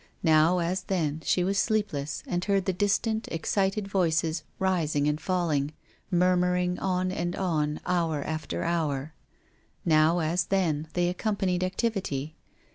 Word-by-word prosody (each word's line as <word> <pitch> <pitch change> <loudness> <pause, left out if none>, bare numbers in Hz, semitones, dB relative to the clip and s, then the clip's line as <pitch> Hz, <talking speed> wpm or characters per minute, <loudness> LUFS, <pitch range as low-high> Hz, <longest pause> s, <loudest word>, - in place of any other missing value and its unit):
Now, 160 +2 +5
as 180 +2 0
then, 160 -5 -1
she 180 - +2
was 195 +2 +1
sleepless, 200 -10 -1
and 175 0 -2
heard 195 -2 +1
the 190 - +1
distant, 215 +4 0
excited 195 +4 -1
voices 165 -4 +1 0.2
rising 165 -6 +1
and 150 0 0
falling, 155 -5 0 0.4
murmuring 180 0 +2
on 185 -1 0
and 175 -1 -2
on 155 -5 0
hour 165 -5 0
after 155 -2 -3
hour. 155 -4 -1 0.7
Now, 160 +1 +4
as 170 +1 +1
then, 165 -5 0
they 175 0 +1
accompanied 185 -1 0
activity. 185 - -2
175 Hz, 130 wpm, -27 LUFS, 155-190 Hz, 0.7 s, Now